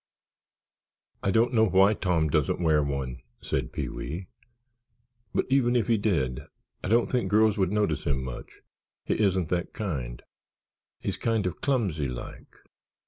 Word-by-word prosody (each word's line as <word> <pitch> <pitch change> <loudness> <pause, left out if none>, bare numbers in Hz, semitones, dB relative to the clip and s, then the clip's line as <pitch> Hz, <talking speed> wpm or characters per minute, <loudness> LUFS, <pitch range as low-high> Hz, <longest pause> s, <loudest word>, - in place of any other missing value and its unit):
"I - - 0
don't 115 +5 +3
know 110 -1 +5
why 95 +2 +5
Tom 90 -6 +1
doesn't 75 -3 +1
wear 80 -3 +3
one," 70 -3 -3 0.2
said 65 -3 -2
Pee - - -3
wee. 85 +5 -6 1.0
"But - - 0
even 125 -2 +3
if 120 - +3
he 115 -3 +2
did 70 - 0 0.4
I - - -2
don't 115 +4 +4
think 125 -2 -1
girls 110 0 +4
would 95 -1 +2
notice 105 -8 0
him 65 -2 0
much—he 65 - -7
isn't 95 -5 +2
that 90 0 -1
kind. 65 - -4 0.8
He's - - -3
kind 115 -3 0
of 90 -1 -3
clumsy, 100 - 0
like. 60 -1 -7
90 Hz, 145 wpm, -27 LUFS, 70-110 Hz, 1.0 s, know